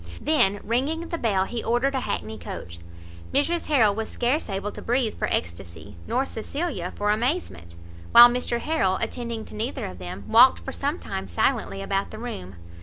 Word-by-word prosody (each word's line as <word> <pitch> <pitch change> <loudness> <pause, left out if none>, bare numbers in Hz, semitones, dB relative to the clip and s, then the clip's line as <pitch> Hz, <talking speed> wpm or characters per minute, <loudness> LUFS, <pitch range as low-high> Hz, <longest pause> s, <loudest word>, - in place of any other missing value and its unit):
Then 205 -10 +2
ringing 285 +9 -1
the 335 - -2
bell, 195 -5 +1
he 235 +3 -4
ordered 245 +4 +1
a 265 - 0
hackney 110 - -4
coach. 85 0 -8 0.5
Mrs 330 +5 0
Harrel 230 -9 +4
was 220 +1 -4
scarce 250 +3 -1
able 200 +1 -3
to - - -9
breathe 240 -2 0
for - - -2
extacy, 85 +1 -4
nor 265 - +1
Cecilia 260 - -4
for 210 0 +1
amazement; 215 - -2 0.4
while 240 0 +11
Mr 240 -1 -1
Harrel, 190 -13 +1
attending 235 -2 -4
to - - -12
neither 220 +5 -3
of 90 -1 -8
them, 90 +2 -7
walked 250 +3 +7
for 270 - -7
some 285 +4 -2
time 95 0 -5
silently 95 +2 0
about 195 - -1
the 215 - -9
room. 95 - -7
225 Hz, 180 wpm, -25 LUFS, -, 0.5 s, while